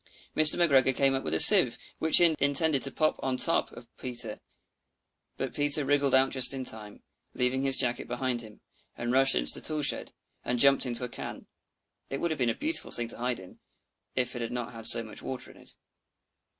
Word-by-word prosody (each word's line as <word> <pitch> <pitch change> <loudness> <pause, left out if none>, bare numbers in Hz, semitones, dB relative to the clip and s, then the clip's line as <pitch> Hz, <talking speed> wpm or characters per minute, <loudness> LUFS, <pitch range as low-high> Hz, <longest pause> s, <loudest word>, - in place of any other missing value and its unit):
Mr. 155 -1 +6
McGregor 135 -6 +1
came 135 -1 +1
up 135 - -3
with - - -5
a - - +1
sieve, - - +8 0.2
which 160 0 +4
he 170 -2 +2
intended 140 0 0
to 135 - +1
pop 155 +3 -3
upon 130 -1 -4
the - - +1
top 165 - -1
of 120 - -14
Peter; 120 -4 -4 1.0
but - - -6
Peter 145 0 +3
wriggled 140 -1 0
out 130 0 +1
just 130 0 +4
in 130 -1 -7
time, 105 -3 -6 0.3
leaving 125 +1 -2
his 135 -1 +1
jacket 125 -2 -3
behind 120 0 -4
him, 110 -2 -16 0.4
and 120 +1 -5
rushed 135 +1 +2
into - - +4
the - - -4
tool 155 -1 -2
shed, - - -3 0.3
and 125 - -4
jumped 135 +1 +3
into 120 0 -4
a - - -4
can. - - -10 0.6
It 135 - -6
would 170 - -3
have 155 - -5
been 120 -2 -1
a 115 - -3
beautiful 320 +2 -1
thing 120 -1 0
to - - -4
hide 125 -1 -4
in, 95 -1 -16 0.6
if 125 -1 -3
it 120 - -7
had 115 0 -6
not 120 -1 -6
had 115 -1 -3
so 115 0 +4
much 110 -1 -11
water 130 -1 -8
in - - -21
it. - - -13
130 Hz, 215 wpm, -26 LUFS, 120-140 Hz, 1.0 s, sieve